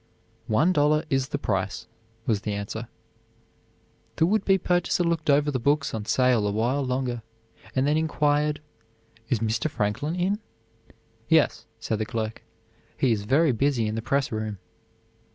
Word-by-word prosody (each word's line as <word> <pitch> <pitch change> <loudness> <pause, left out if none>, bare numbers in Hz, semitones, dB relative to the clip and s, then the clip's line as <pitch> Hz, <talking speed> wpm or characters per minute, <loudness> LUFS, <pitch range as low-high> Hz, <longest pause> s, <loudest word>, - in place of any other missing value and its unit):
"One 135 +11 +3
dollar 150 0 +3
is 135 -1 +1
the 145 - -2
price," 100 -2 -2 0.4
was 105 -4 +1
the 105 - -3
answer. 105 +3 -5 1.3
The 160 - +3
would 205 +3 +2
be 195 -1 +4
purchaser 175 0 +1
looked 165 -3 -1
over 145 +1 +4
the 130 - -1
books 145 +3 +1
on 110 -2 -3
sale 125 -3 +3
a - - 0
while 120 +7 0
longer, 125 -2 -2 0.5
and 130 0 +2
then 150 +2 +2
inquired: 150 -1 +1 0.7
"Is 115 -4 +1
Mr. 115 +6 0
Franklin 125 +7 -1
in?" 190 +4 0 0.9
"Yes," 155 -8 +3
said 110 -1 -2
the 110 - -2
clerk, 110 -2 -3 0.6
"he 130 - +2
is 105 -2 0
very 145 +6 +4
busy 125 -1 +1
in 105 - -2
the 115 - -2
press 135 +3 0
room." 110 -2 -3
130 Hz, 155 wpm, -26 LUFS, 110-150 Hz, 1.3 s, be